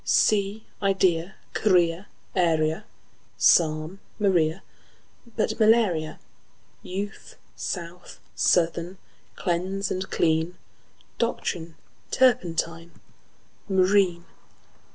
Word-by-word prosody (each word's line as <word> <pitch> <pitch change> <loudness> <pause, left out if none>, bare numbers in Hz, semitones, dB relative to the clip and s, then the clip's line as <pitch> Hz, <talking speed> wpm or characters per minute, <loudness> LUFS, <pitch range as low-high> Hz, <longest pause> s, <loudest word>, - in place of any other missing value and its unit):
Sea, 210 +1 +2 0.2
idea, 190 -3 +1 0.2
guinea, 180 -2 +2 0.3
area, 165 +1 +1 0.5
Psalm; 155 +2 +3 0.2
Maria, 180 -4 +1 0.7
but - - -1
malaria; 215 -8 +3 0.6
Youth, 200 +3 -6 0.2
south, 175 -1 -6
southern; 170 +1 +1 0.4
cleanse 185 +3 -2
and 185 +1 -3
clean; 160 +2 0 0.6
Doctrine, 170 -8 -2 0.3
turpentine, 170 -9 +1 0.8
marine. 185 -2 +3
180 Hz, 70 wpm, -25 LUFS, 165-195 Hz, 0.8 s, Psalm